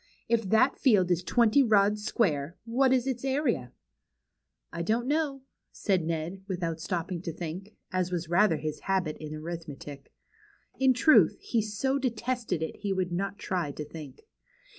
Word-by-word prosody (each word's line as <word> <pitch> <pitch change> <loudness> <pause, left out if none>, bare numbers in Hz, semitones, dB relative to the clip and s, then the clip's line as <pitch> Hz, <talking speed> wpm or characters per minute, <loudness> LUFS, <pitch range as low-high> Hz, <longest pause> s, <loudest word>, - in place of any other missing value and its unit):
" - - -38
If 225 -4 -3
that 220 +6 +3
field 200 -9 +4
is 175 0 +1
twenty 235 +6 +4
rods 210 -2 +3
square, 165 -8 0
what 255 +3 +2
is 255 -1 +3
its 260 -2 -3
area? 265 - 0 0.4
" - - -55
" - - -48
I 170 - -3
don 220 +7 +1
t - - -7
know," 290 -3 0 0.3
said 190 -5 0
Ned, 165 +3 -3
without 170 -4 -3
stopping 175 -1 -3
to 175 - -4
think, 180 +6 -7 0.2
as 185 -1 0
was 175 -2 -2
rather 175 0 +3
his 155 0 -4
habit 185 -5 -1
in 155 0 -6
arithmetic. 155 -3 -8 0.7
In 265 -1 +4
truth, 310 +5 +5
he 230 - 0
so 265 +6 -1
detested 240 - -2
it 160 - -5
he 200 -1 -3
would 185 -2 -1
not 195 +3 -2
try 175 -8 -2
to 150 - -6
think. 150 -3 -11
190 Hz, 175 wpm, -28 LUFS, 165-235 Hz, 0.7 s, truth